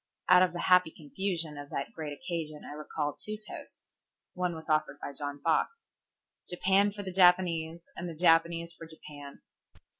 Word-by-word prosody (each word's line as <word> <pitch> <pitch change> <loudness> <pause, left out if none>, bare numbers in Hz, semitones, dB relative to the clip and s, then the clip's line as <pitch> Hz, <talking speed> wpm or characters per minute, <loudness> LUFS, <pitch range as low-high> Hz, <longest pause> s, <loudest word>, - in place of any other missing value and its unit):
Out 180 - +7
of 185 -2 +4
the 175 - -4
happy 180 -2 +5
confusion 160 0 -3
of 145 0 -8
that 140 - -4
great 155 -2 -5
occasion 155 -1 -5
I - - -7
recall 150 0 -3
two 215 0 -3
toasts. 210 0 -10 0.3
One 180 -2 -1
was 160 0 -10
offered 155 -2 +1
by 140 - -6
John 145 0 -5
Fox. 460 - +1 0.7
"Japan 195 +3 +3
for 205 0 -7
the 190 - -5
Japanese, 175 -3 +3
and 175 0 -4
the 165 - -7
Japanese 170 0 +3
for 165 -1 -11
Japan." 145 -3 -12
165 Hz, 170 wpm, -30 LUFS, 155-180 Hz, 0.7 s, Out